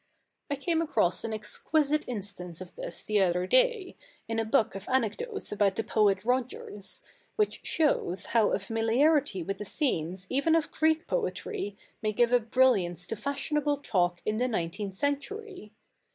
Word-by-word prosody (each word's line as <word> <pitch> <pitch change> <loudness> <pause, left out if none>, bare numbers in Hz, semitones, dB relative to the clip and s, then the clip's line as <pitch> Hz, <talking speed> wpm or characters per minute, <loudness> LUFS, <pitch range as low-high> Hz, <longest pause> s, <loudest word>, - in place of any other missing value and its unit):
I 285 - 0
came 330 +3 0
across 185 - +1
an 230 - -3
exquisite 295 +8 0
instance 195 -7 -5
of 185 -1 -10
this - - -5
the 210 -1 +2
other 180 -1 +2
day, 475 - +3 0.3
in 225 0 -1
a 225 - 0
book 220 0 +2
of 195 +1 -7
anecdotes 265 - -1
about 205 -2 +2
the 225 - -1
poet 210 -2 +2
Rogers, 245 -5 -2 0.3
which 425 -1 +1
shows 235 - +1
how 225 -3 +5
a - - +2
familiarity 225 - +2
with 195 +3 -4
the - - -3
scenes 185 - -1
even 285 - +2
of 330 -1 +1
Greek 315 +2 +2
poetry 430 - -3 0.2
may 215 -1 0
give 240 +2 +3
a 245 - +6
brilliance 220 -8 +2
to 200 - -4
fashionable 285 +4 -1
talk 175 -9 0
in 215 0 0
the 250 +2 +1
nineteenth 195 -2 -3
century. 285 - -3
225 Hz, 160 wpm, -29 LUFS, 195-295 Hz, 0.3 s, a